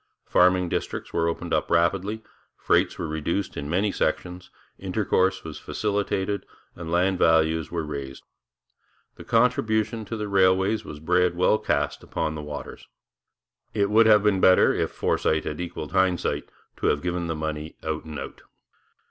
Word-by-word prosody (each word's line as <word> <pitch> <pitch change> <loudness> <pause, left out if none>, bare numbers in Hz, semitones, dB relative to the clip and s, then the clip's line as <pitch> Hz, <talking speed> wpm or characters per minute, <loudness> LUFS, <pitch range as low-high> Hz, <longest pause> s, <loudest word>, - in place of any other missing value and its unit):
Farming 90 0 +3
districts - - -4
were 85 0 +1
opened 85 - -3
up - - 0
rapidly, 95 +6 +1 0.3
freights - - +1
were - - -3
reduced 80 +5 -2
in 70 0 -5
many 95 +5 +1
sections, 90 -1 -2 0.3
intercourse 95 -1 0
was 80 -2 -7
facilitated, 100 -1 -2 0.3
and 85 -1 -7
land 90 +2 +2
values 80 -1 +3
were 85 -2 -3
raised. 70 -3 -6 0.9
The - - -10
contribution 115 -1 +1
to 115 +3 -5
the 105 -1 -3
railways 95 +2 +2
was 75 - -9
bread 90 +2 +2
well 90 +4 +3
cast - - -1
upon 80 - -3
the 75 - -6
waters. 75 -1 -8 0.9
It 100 -1 +1
would 110 +1 +6
have 105 -2 +6
been 100 -3 +2
better, 95 0 +6
if - - -1
foresight 80 0 0
had 75 +3 -4
equalled 85 -3 -6
hindsight, 95 -1 0 0.3
to - - -1
have 75 - +1
given 90 -1 -2
the 80 - -2
money 75 0 -4
out 80 0 -3
and 80 -2 -8
out. - - -8
90 Hz, 155 wpm, -25 LUFS, 80-100 Hz, 0.9 s, would